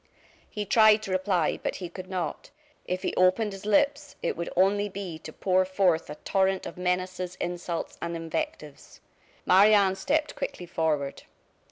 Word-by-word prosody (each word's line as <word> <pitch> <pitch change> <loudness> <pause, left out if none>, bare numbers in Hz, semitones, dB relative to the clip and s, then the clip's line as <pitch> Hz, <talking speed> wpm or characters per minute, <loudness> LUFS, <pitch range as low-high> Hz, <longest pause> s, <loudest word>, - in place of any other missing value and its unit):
He 210 -1 -4
tried 215 +1 +5
to 195 - -5
reply, 185 -3 +1
but - - -2
he 180 - -5
could 185 +2 -9
not. 180 -5 -4 0.4
If 185 0 -2
he - - -1
opened 190 +3 +2
his 195 +2 -8
lips 285 +6 +1
it - - 0
would 170 +1 -4
only 205 +3 +3
be 185 -5 -6
to 160 - -9
pour 185 +3 +2
forth 185 -4 +1
a 150 - -6
torrent 190 +3 0
of - - -7
menaces, 180 0 -2
insults, 175 -1 -4
and 170 0 -3
invectives. 155 -3 -5 0.5
Marie 205 +3 +6
Anne 195 -2 +4
stepped 300 +9 -1
quickly - - -5
forward. 155 -5 -1
185 Hz, 165 wpm, -27 LUFS, 175-200 Hz, 0.5 s, Marie